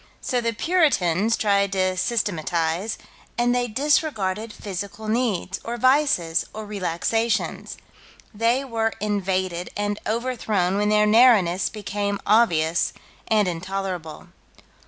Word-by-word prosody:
So 250 Hz, -1 st, -1 dB
the 230 Hz, 0 st, 0 dB
Puritans 230 Hz, -, +2 dB
tried 200 Hz, -2 st, +1 dB
to 185 Hz, -1 st, +1 dB
systematize, 185 Hz, -2 st, -1 dB, 0.4 s
and 240 Hz, 0 st, +2 dB
they 245 Hz, 0 st, 0 dB
disregarded 225 Hz, -, 0 dB
physical 200 Hz, +2 st, -6 dB
needs, 215 Hz, -5 st, -1 dB
or 235 Hz, +1 st, -4 dB
vices, 255 Hz, -, +2 dB
or 215 Hz, 0 st, -6 dB
relaxations: 210 Hz, +4 st, -2 dB, 0.6 s
they 230 Hz, +5 st, +1 dB
were 225 Hz, -3 st, -1 dB
invaded 190 Hz, -3 st, -1 dB
and 205 Hz, 0 st, -2 dB
overthrown 220 Hz, -5 st, -1 dB
when 210 Hz, 0 st, +1 dB
their 210 Hz, 0 st, +4 dB
narrowness 210 Hz, -5 st, +4 dB
became 205 Hz, -1 st, -3 dB
obvious 170 Hz, -7 st, +2 dB, 0.3 s
and 215 Hz, -3 st, +3 dB
intolerable. 180 Hz, -2 st, -5 dB
205 Hz, 110 wpm, -23 LUFS, 185-230 Hz, 0.6 s, their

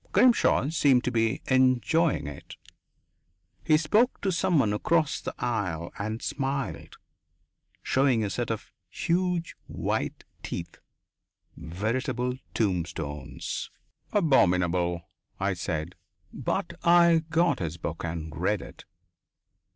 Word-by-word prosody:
Grimshaw 240 Hz, -, +4 dB
seemed 140 Hz, -6 st, +3 dB
to 125 Hz, -, -1 dB
be 115 Hz, 0 st, 0 dB
enjoying 130 Hz, +5 st, +3 dB
it. 70 Hz, -1 st, -9 dB, 1.1 s
He 155 Hz, -2 st, +4 dB
spoke 210 Hz, +11 st, +2 dB
to 195 Hz, -, +1 dB
someone 160 Hz, -, +2 dB
across 155 Hz, +7 st, +1 dB
the -, -, -5 dB
aisle 90 Hz, -8 st, -2 dB
and 110 Hz, +3 st, -3 dB
smiled, 135 Hz, -1 st, -3 dB, 0.9 s
showing 130 Hz, -4 st, +2 dB
a 100 Hz, -, -2 dB
set -, -, -2 dB
of -, -, -4 dB, 0.2 s
huge 175 Hz, -1 st, -1 dB
white -, -, -2 dB, 0.2 s
teeth, 85 Hz, 0 st, -6 dB, 0.8 s
veritable 120 Hz, -, -2 dB, 0.2 s
tombstones. 85 Hz, -, -3 dB, 0.4 s
"Abominable," 90 Hz, -, +2 dB, 0.3 s
I -, -, +1 dB
said. 80 Hz, +3 st, -3 dB, 0.4 s
But -, -, -2 dB
I 170 Hz, -1 st, +6 dB
got 170 Hz, +2 st, +2 dB
his 80 Hz, -2 st, -3 dB
book 80 Hz, -1 st, -5 dB
and 80 Hz, -2 st, -4 dB
read -, -, 0 dB
it. -, -, -12 dB
125 Hz, 105 wpm, -27 LUFS, -, 1.1 s, I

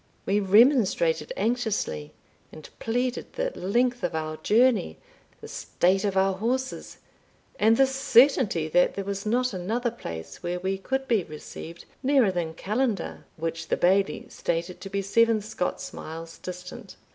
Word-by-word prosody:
We 200 Hz, +1 st, +2 dB
remonstrated 245 Hz, -, +4 dB
anxiously, 215 Hz, -, -1 dB, 0.4 s
and 155 Hz, -, -11 dB
pleaded 245 Hz, +2 st, -2 dB
the -, -, -1 dB
length 245 Hz, -, 0 dB
of 175 Hz, -2 st, -1 dB
our 155 Hz, 0 st, -3 dB
journey, 220 Hz, -, +2 dB, 0.4 s
the -, -, -8 dB
state 190 Hz, +2 st, 0 dB
of 200 Hz, -2 st, 0 dB
our 190 Hz, 0 st, +3 dB
horses, 250 Hz, +7 st, -3 dB, 0.6 s
and 220 Hz, +2 st, +5 dB
the 270 Hz, -, +6 dB
certainty 260 Hz, -, +3 dB
that 180 Hz, +3 st, +3 dB
there 200 Hz, -, -3 dB
was 200 Hz, +1 st, -4 dB
not 250 Hz, +2 st, +1 dB
another 225 Hz, +7 st, -1 dB
place 80 Hz, -, -8 dB
where 175 Hz, +1 st, -3 dB
we 190 Hz, +1 st, -2 dB
could 265 Hz, +6 st, -2 dB
be 220 Hz, -6 st, +2 dB
received 160 Hz, +2 st, -9 dB, 0.2 s
nearer 265 Hz, -6 st, +4 dB
than 170 Hz, -3 st, -3 dB
Callander, 215 Hz, +4 st, -2 dB
which 165 Hz, 0 st, -4 dB
the -, -, 0 dB
Bailie 195 Hz, +2 st, +2 dB
stated 170 Hz, +2 st, -3 dB
to 195 Hz, -, -7 dB
be 195 Hz, 0 st, -2 dB
seven 230 Hz, +3 st, +3 dB
Scots 210 Hz, -3 st, -4 dB
miles 165 Hz, +1 st, -8 dB
distant. 180 Hz, 0 st, -8 dB
200 Hz, 145 wpm, -26 LUFS, 175-245 Hz, 0.6 s, the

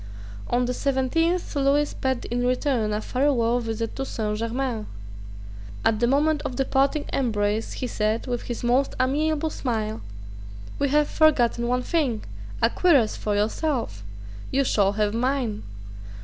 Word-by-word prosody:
On 245 Hz, +1 st, +2 dB
the 250 Hz, -, -1 dB
seventeenth 295 Hz, +7 st, 0 dB
Lewis 285 Hz, +1 st, +2 dB
paid 260 Hz, -2 st, -2 dB
in 245 Hz, +1 st, -1 dB
return 250 Hz, -3 st, +1 dB
a 210 Hz, +1 st, -1 dB
farewell 245 Hz, -2 st, +1 dB
visit 225 Hz, -1 st, -3 dB
to 270 Hz, -, -1 dB
Saint 210 Hz, -5 st, -3 dB
Germains. 230 Hz, -1 st, -2 dB, 1.0 s
At 220 Hz, -1 st, +3 dB
the 240 Hz, -, +3 dB
moment 295 Hz, +3 st, +2 dB
of 250 Hz, -, -4 dB
the 270 Hz, -, 0 dB
parting 275 Hz, +3 st, +1 dB
embrace 215 Hz, -3 st, 0 dB
he -, -, -4 dB
said, 220 Hz, -1 st, -1 dB
with 245 Hz, -2 st, -2 dB
his 240 Hz, -, -4 dB
most 250 Hz, +3 st, +2 dB
amiable 305 Hz, +4 st, +1 dB
smile: 220 Hz, -6 st, -2 dB, 0.8 s
"We 280 Hz, -, +1 dB
have 295 Hz, +1 st, +3 dB
forgotten 240 Hz, -6 st, +3 dB
one 250 Hz, +1 st, 0 dB
thing, 270 Hz, -10 st, 0 dB, 0.4 s
a 230 Hz, -, +4 dB
cuirass 285 Hz, -12 st, +3 dB
for 210 Hz, -1 st, -2 dB
yourself. 220 Hz, -, -1 dB, 0.5 s
You 275 Hz, +1 st, +2 dB
shall 200 Hz, -6 st, +2 dB
have 210 Hz, 0 st, 0 dB
mine." 240 Hz, -3 st, -1 dB
250 Hz, 150 wpm, -25 LUFS, 225-280 Hz, 1.0 s, a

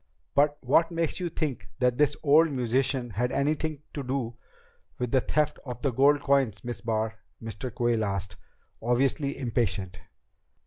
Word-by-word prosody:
"But 145 Hz, +1 st, +3 dB
what 155 Hz, +6 st, +4 dB
makes 165 Hz, -1 st, -1 dB
you 180 Hz, -1 st, -2 dB
think 150 Hz, -8 st, -3 dB
this 130 Hz, +4 st, +2 dB
old 155 Hz, +2 st, +6 dB
musician 130 Hz, -1 st, 0 dB
had 125 Hz, +5 st, -1 dB
anything 150 Hz, +1 st, -1 dB
to 145 Hz, -, -3 dB
do 125 Hz, -3 st, -2 dB, 0.6 s
with 125 Hz, -2 st, -2 dB
the 130 Hz, -, +4 dB
theft 150 Hz, +2 st, 0 dB
of 125 Hz, -3 st, -7 dB
the 140 Hz, -, +2 dB
gold 140 Hz, +4 st, +4 dB
coins, 135 Hz, -8 st, +1 dB
Miss 120 Hz, -1 st, -4 dB
Barr?" 110 Hz, -1 st, -1 dB, 0.2 s
Mr. 115 Hz, +2 st, -6 dB
Quayle 120 Hz, -1 st, +1 dB
asked, 100 Hz, -2 st, -3 dB, 0.5 s
obviously 135 Hz, +4 st, +1 dB
impatient. 115 Hz, -7 st, -1 dB
130 Hz, 145 wpm, -28 LUFS, 115-145 Hz, 0.6 s, old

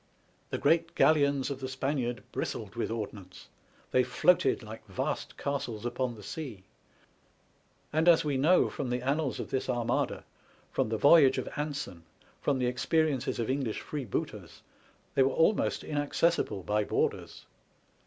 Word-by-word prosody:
The -, -, -2 dB
great 165 Hz, +3 st, +2 dB
galleons 140 Hz, -3 st, +3 dB
of 135 Hz, -, -4 dB
the 130 Hz, -, -4 dB
Spaniard 130 Hz, -2 st, -2 dB
bristled 105 Hz, -4 st, -4 dB
with 115 Hz, -, -2 dB
ordnance, 100 Hz, -4 st, -7 dB, 0.4 s
they 130 Hz, -, +4 dB
floated 175 Hz, 0 st, +3 dB
like 110 Hz, 0 st, -9 dB
vast 95 Hz, -, -3 dB
castles 130 Hz, -6 st, -3 dB
upon 120 Hz, 0 st, -2 dB
the 105 Hz, -, -12 dB
sea, 120 Hz, -6 st, -6 dB, 1.3 s
and 160 Hz, +2 st, +2 dB
as 165 Hz, -2 st, +5 dB
we 145 Hz, -2 st, 0 dB
know 155 Hz, +8 st, +4 dB
from 135 Hz, -4 st, -4 dB
the 125 Hz, 0 st, -2 dB
annals 140 Hz, +1 st, 0 dB
of -, -, -6 dB
this 130 Hz, 0 st, -1 dB
Armada, 120 Hz, -2 st, 0 dB, 0.5 s
from -, -, 0 dB
the 110 Hz, -, -1 dB
voyage 140 Hz, +2 st, +6 dB
of -, -, -2 dB
Anson, 145 Hz, -, -4 dB, 0.4 s
from 140 Hz, -2 st, +1 dB
the 125 Hz, -, 0 dB
experiences 135 Hz, +2 st, 0 dB
of 115 Hz, -, -1 dB
English 130 Hz, -5 st, -2 dB
freebooters, 135 Hz, -9 st, -5 dB, 0.5 s
they 135 Hz, -, +3 dB
were 135 Hz, -, +5 dB
almost 195 Hz, +6 st, +2 dB
inaccessible 145 Hz, -, 0 dB
by 105 Hz, +2 st, +1 dB
boarders. -, -, -2 dB
130 Hz, 145 wpm, -30 LUFS, 115-145 Hz, 1.3 s, voyage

